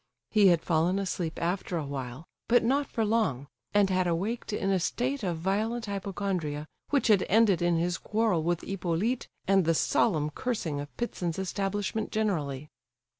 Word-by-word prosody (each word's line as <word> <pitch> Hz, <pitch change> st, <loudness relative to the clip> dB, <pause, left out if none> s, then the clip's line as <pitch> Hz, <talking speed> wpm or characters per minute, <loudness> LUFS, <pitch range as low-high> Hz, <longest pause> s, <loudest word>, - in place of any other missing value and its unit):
He 210 Hz, -2 st, +6 dB
had 170 Hz, -3 st, +4 dB
fallen 170 Hz, +3 st, +2 dB
asleep 180 Hz, -4 st, -2 dB
after 175 Hz, +1 st, -1 dB
a 155 Hz, -, -2 dB
while, 135 Hz, +1 st, -6 dB, 0.2 s
but 240 Hz, 0 st, +4 dB
not 275 Hz, +4 st, +2 dB
for 225 Hz, -3 st, -1 dB
long, 210 Hz, -, +1 dB, 0.3 s
and 205 Hz, -2 st, +3 dB
had 185 Hz, -1 st, +2 dB
awaked 195 Hz, +9 st, -2 dB
in 200 Hz, -2 st, 0 dB
a 190 Hz, -, +2 dB
state 255 Hz, +9 st, -1 dB
of 175 Hz, -5 st, -1 dB
violent 215 Hz, +7 st, -1 dB
hypochondria 190 Hz, -7 st, -3 dB, 0.2 s
which 285 Hz, -2 st, +2 dB
had 210 Hz, -5 st, +5 dB
ended 205 Hz, -4 st, +4 dB
in 175 Hz, -1 st, +2 dB
his 175 Hz, +1 st, 0 dB
quarrel 215 Hz, -6 st, +1 dB
with 175 Hz, +1 st, 0 dB
Hippolyte, 195 Hz, +6 st, -1 dB, 0.2 s
and 195 Hz, -1 st, +4 dB
the 165 Hz, 0 st, +2 dB
solemn 155 Hz, -4 st, +2 dB
cursing 170 Hz, -, -2 dB
of 145 Hz, 0 st, -5 dB
Ptitsin's 180 Hz, -8 st, -2 dB
establishment 200 Hz, +2 st, -2 dB
generally. 150 Hz, -10 st, -1 dB
190 Hz, 165 wpm, -29 LUFS, 165-215 Hz, 0.3 s, He